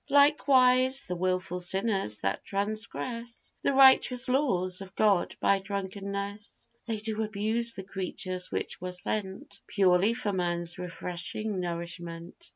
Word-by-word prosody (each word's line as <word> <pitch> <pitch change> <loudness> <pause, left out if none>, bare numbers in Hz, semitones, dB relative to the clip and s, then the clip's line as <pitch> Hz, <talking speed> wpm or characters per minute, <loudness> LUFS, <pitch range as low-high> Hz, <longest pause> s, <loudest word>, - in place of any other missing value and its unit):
Likewise, 265 -2 +5
the 180 - -4
wilful 185 0 -1
sinners 190 - -1
that 95 +1 -1
transgress 230 +4 -4
The - - +2
righteous 265 -2 +6
laws 190 -9 +1
of 195 0 -10
God 205 -4 +2
by 200 - +3
drunkenness, 200 +1 -5 0.2
They 225 -2 -1
do 220 +1 -2
abuse 220 +2 +1
the 190 - -6
creatures 185 -1 -4
which - - -4
were 180 0 -4
sent 195 +1 -4
Purely 195 +3 +3
for 215 -5 -2
man's 175 -1 -1
refreshing 180 +4 -3
nourishment. 170 - -6
200 Hz, 125 wpm, -29 LUFS, 180-230 Hz, 0.2 s, righteous